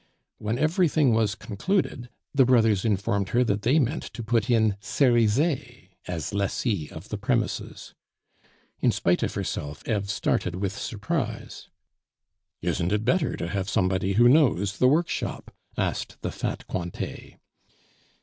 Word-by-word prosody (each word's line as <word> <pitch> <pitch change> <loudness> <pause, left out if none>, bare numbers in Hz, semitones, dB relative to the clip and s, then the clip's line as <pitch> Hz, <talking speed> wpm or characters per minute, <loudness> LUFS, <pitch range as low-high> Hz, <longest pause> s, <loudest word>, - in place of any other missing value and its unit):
When 110 +3 -2
everything 155 - +3
was 110 -2 +1
concluded, 125 - -2 0.2
the 135 -2 +5
brothers 115 -6 +3
informed 100 -2 0
her 120 +4 +3
that 100 -3 0
they 130 +8 +3
meant 145 +1 +1
to 120 - -5
put 115 +1 0
in 110 -4 +3
Cerizet 125 +5 +1 0.2
as 85 -3 -4
lessee 100 - -1
of 80 +7 -10
the 105 - -4
premises. 115 +2 -2 0.9
In - - +3
spite - - +1
of - - -2
herself, 75 0 -4
Eve 100 -4 -1
started 90 -3 0
with 100 +1 -2
surprise. 120 +5 -4 0.9
"Isn't 90 +1 0
it 105 +1 0
better 155 +5 +1
to - - -3
have 95 +1 -2
somebody 95 +1 +1
who 120 +4 +6
knows 120 - +3
the 125 - +5
workshop?" 160 +6 -1 0.2
asked - - -2
the - - -2
fat - - -4
Cointet. 85 -1 -5
110 Hz, 140 wpm, -26 LUFS, 100-130 Hz, 0.9 s, who